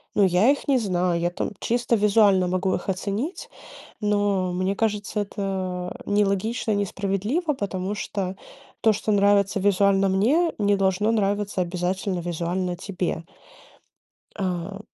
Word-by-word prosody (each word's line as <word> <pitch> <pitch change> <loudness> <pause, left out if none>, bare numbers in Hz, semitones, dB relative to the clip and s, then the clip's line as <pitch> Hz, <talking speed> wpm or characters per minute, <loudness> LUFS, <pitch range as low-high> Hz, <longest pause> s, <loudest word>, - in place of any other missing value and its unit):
Ну, 205 - +4
я 185 +7 +4
их 285 - -3
не 275 -2 +4
знаю, 180 -5 0
я 175 +1 0
там - - -3
чисто 240 0 +1
визуально 205 -3 +4
могу 185 +1 0
их - - -6
оценить, 205 - -3 0.5
но 205 -3 +1
мне 185 +2 0
кажется, 210 -1 -1
это 190 -3 -4
нелогично 205 +3 0
и - - +2
несправедливо, 200 - -1
потому 195 -4 -3
что 195 -2 -3 0.5
то, 220 - +5
что 215 - -2
нравится 200 -1 +3
визуально 195 0 +3
мне, 270 - +2
не 205 -1 +3
должно 195 +2 +1
нравиться 205 -2 0
обязательно 180 +1 -2
визуально 175 +1 -2
тебе. 180 -3 -3 1.1
А. 185 0 -3
195 Hz, 135 wpm, -24 LUFS, 185-210 Hz, 1.1 s, то